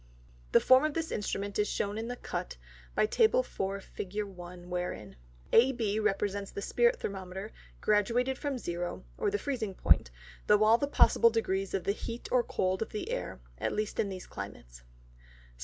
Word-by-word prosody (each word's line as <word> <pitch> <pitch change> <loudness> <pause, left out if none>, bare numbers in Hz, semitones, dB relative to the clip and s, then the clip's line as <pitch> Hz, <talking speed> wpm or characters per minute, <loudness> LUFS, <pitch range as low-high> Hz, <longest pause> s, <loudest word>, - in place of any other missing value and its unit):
The - - +7
Form 260 +2 +6
of 305 -1 0
this 325 0 -2
Instrument 205 -1 -2
is 210 - +3
shown 200 +1 -1
in 225 +1 -3
the 245 - -3
Cut, 180 - -5 0.4
by - - +4
Tab. 440 - +3
4. 195 +1 -3
Fig. 205 +2 -4
1. 180 -2 -10
wherein, 180 - -4 0.4
AB 230 -4 +4
represents 200 -1 0
the 200 - -6
Spirit 480 0 +2
Thermometer, 190 +1 -5 0.3
graduated 235 +5 +2
from 285 -3 -2
0, 175 -5 -4 0.2
or 435 - +2
the 415 - 0
freezing 240 - -3
Point, 80 - +3 0.4
through 210 0 +5
all 225 +2 +6
the 285 - 0
possible 235 -4 +5
degrees 195 -4 -1
of 190 - -1
the - - +1
Heat 230 +3 -6
or 250 - +5
Cold 185 -2 -1
of 225 - -2
the 210 - -4
Air, - - -4 0.2
at - - -1
least 215 0 -2
in 200 - +1
these 185 -1 -6
Climates. - - -9
210 Hz, 175 wpm, -31 LUFS, 190-235 Hz, 0.4 s, The